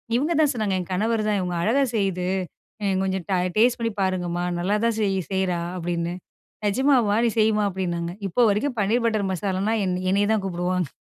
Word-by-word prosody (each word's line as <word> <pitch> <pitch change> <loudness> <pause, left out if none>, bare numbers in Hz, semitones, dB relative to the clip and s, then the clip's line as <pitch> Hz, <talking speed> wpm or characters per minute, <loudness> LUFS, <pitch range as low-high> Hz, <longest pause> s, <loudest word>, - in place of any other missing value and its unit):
இவுங்க 295 +7 +1
தான் 295 -3 +3
சொன்னாங்க, 215 -5 -1
என் 180 - -6
கணவர் 215 +3 0
தான். 210 - +1
"இவங்க 180 -1 -2
அழகாக 255 +9 +2
செய்யுது. 190 -4 0 0.6
அ - - 0 0.2
கொஞ்சம் 190 -2 -2
ட - - +3 0.2
டேஸ்ட் 240 +3 +4
பண்ணி 230 -1 -1
பாருங்கம்மா. 175 -2 -1
நல்லாதான் 210 +5 +1
செய் 195 -2 +1
செய்றா" 190 -2 0 0.2
அப்படின்னு. 170 0 -2 0.5
"நிஜமாவா! 240 -2 +3
நீ - - +1
செய்யுமா" 215 -1 +3
அப்படின்னாங்க. 175 -2 -3 0.2
இப்போ 240 +7 +2
வரைக்கும் 245 +5 -1
பன்னீர் 230 +4 +1
பட்டர் 215 -4 0
மசாலான்னா 195 +3 -1
என்னை 180 0 -1
என்னைய 200 +1 +2
தான் 215 -3 0
கூப்பிடுவாங்க. 180 -1 -1
195 Hz, 175 wpm, -24 LUFS, 180-220 Hz, 0.6 s, டேஸ்ட்